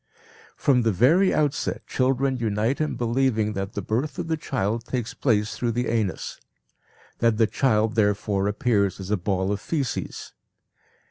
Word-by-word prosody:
From 130 -3 +3
the 115 -1 +2
very 155 - +4
outset 150 -2 -1
children 130 +1 +1
unite 115 +4 0
in 155 - -1
believing 115 -3 +1
that 95 0 -4
the 100 - -4
birth 125 +10 -2
of 175 -2 -4
the 160 - +2
child 115 -7 -2
takes 120 -2 -3
place 105 -5 0
through 120 -2 -1
the 120 +2 -1
anus; 110 -4 -2 0.8
that 115 -2 +2
the 115 - +5
child 110 -2 +1
therefore 105 -2 +1
appears 105 -2 +1
as 95 +1 -6
a - - +4
ball 95 +1 -1
of 105 0 -2
faeces. 145 -6 -3
115 Hz, 155 wpm, -24 LUFS, 105-130 Hz, 0.8 s, the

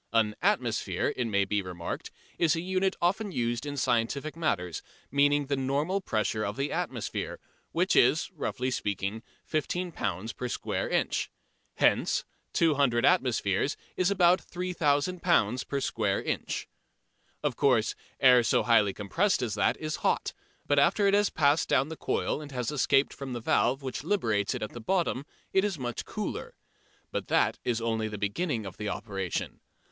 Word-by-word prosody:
An 110 -2 +2
"atmosphere," - - +1
it 125 - -1
may 100 -2 +2
be 100 +1 0
remarked, 90 -2 -5 0.3
is 165 -2 +4
a 165 - -2
unit 190 +1 0
often 200 +4 +1
used 120 -1 -1
in 145 0 -4
scientific 130 +5 0
matters, 90 - -1 0.3
meaning 145 +1 +3
the 140 +1 0
normal 145 +9 0
pressure 110 - -1
of 105 +1 -3
the 140 +1 -1
atmosphere, - - -3 0.3
which - - +1
is, - - +4
roughly 130 +1 -2
speaking, 100 -1 -2 0.2
15 175 +3 -2
lb. 105 - -3
per 125 - -3
square - - -2
inch. - - 0 0.5
Hence - - +2 0.3
200 140 -7 +3
atmospheres 130 - +2 0.2
is 185 +1 +2
about 180 -2 +4
3000 175 -1 0
lb. 125 - +2
per 140 - -1
square 105 -6 0
inch. - - -3 0.8
Of - - 0
course 125 -6 +3 0.3
air 125 -2 +7
so 115 - +2
highly 105 -4 +4
compressed 165 - +1
as 115 -4 -2
that 105 - +1
is 155 -1 -3
hot, - - 0 0.3
but 145 -1 +3
after 200 +8 +3
it 200 - +4
has 205 0 +4
passed 145 +1 +2
down 140 - +3
the 160 - -5
coil 155 - -1
and 145 -1 -9
has 125 -1 -2
escaped 135 -1 +2
from 135 -2 -6
the 120 - -3
valve 125 +4 +1
which 130 0 -4
liberates 115 - 0
it - - -4
at 105 - -4
the 120 - -7
bottom 160 -2 0 0.3
it 190 - +4
is 205 -5 -1
much 120 -3 -4
cooler. - - -5 0.6
But - - -3
that - - +2
is 120 -2 0
only 115 -1 -1
the 105 -1 -5
beginning 110 - -1
of 95 - -8
the 105 -1 -3
operation. 95 -5 -4
130 Hz, 165 wpm, -29 LUFS, 110-160 Hz, 0.8 s, air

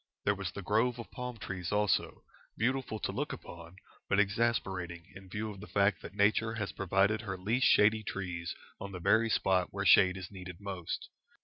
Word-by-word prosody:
There 100 - +4
was 95 -2 -4
the 100 - -7
grove 115 +5 +2
of 120 - -8
palm 125 -2 -5
trees 95 -4 -5
also, 105 -1 +1 0.3
beautiful 125 -1 0
to - - -2
look - - -2
upon, 85 0 -10 0.3
but 100 - +3
exasperating 95 -5 0
in 95 -1 -12
view 105 +3 -3
of 100 - -10
the 105 - -9
fact 100 -3 +2
that - - -9
Nature 110 +2 +2
has 105 -3 -3
provided 100 +3 +1
her 100 -4 -4
least 110 +8 +2
shady 110 +1 +5
trees 90 -4 -4 0.2
on 100 0 -7
the 90 - -5
very 110 +6 +3
spot 95 -3 +2
where - - -3
shade 95 0 +6
is 95 0 -7
needed 90 -2 -9
most. 95 -4 -5
100 Hz, 190 wpm, -32 LUFS, 95-110 Hz, 0.3 s, shade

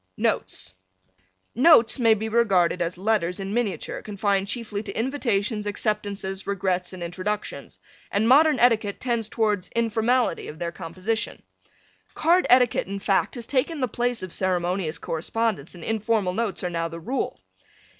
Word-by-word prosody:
NOTES 95 0 -1 0.8
Notes 255 -2 +6
may 225 -2 +5
be 220 +1 -3
regarded 195 -6 +2
as 170 +1 -2
letters 190 -2 0
in 195 +1 -4
miniature 230 -4 -2
confined 200 -1 -1
chiefly 210 -2 -3
to 205 -2 -7
invitations, 225 -4 -1
acceptances, 205 -2 -2
regrets 185 -2 -1
and 185 -2 -7
introductions, 185 +5 -4 0.3
and 210 +3 +1
modern 295 +3 +6
etiquette 225 -4 +2
tends 235 -4 -1
towards 210 -5 0
informality 230 -1 +1
in 150 - -8
their 170 0 -3
composition. 185 +7 -3 0.7
Card 345 +3 +3
etiquette, 250 -1 +4
in 200 +1 -4
fact, 195 +4 0
has 240 -2 -4
taken 285 +5 0
the 255 - +1
place 240 -1 -1
of 185 - -6
ceremonious 180 -2 -1
correspondence 185 0 -2
and 170 - -10
informal 215 -3 0
notes 210 -3 -2
are 180 - -2
now 165 -1 -1
the 165 0 -8
rule. 255 +11 -3
210 Hz, 145 wpm, -25 LUFS, 185-230 Hz, 0.8 s, Notes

